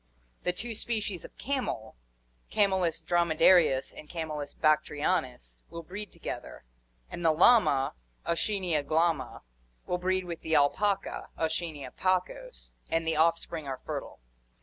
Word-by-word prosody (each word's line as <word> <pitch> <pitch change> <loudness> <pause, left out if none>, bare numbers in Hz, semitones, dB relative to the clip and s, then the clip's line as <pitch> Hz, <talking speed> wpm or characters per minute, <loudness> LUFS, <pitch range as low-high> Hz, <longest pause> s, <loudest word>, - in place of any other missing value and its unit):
The 180 - +1
two 225 +6 -5
species 215 -5 -3
of - - -13
camel, 255 - -3 0.5
Camelus 190 -5 +2
dromedarius 165 -4 +4
and 150 - -11
C. 155 -4 -5
bactrianus, 150 - 0
will 170 0 -7
breed 200 +5 -7
together; - - -7 0.5
and 175 - -6
the 165 - +5
llama, 155 - +5 0.3
Auchenia 175 -2 0
glama, 155 -2 0 0.4
will 180 - -1
breed 185 +1 0
with 170 -2 -6
the 160 - 0
alpaca, 195 +8 +1
A. 160 - +1
pacos, 180 - -3 0.2
and 165 0 0
the 160 0 +2
offspring 165 -1 +1
are 130 -1 -4
fertile. - - -5
165 Hz, 125 wpm, -29 LUFS, 155-185 Hz, 0.5 s, the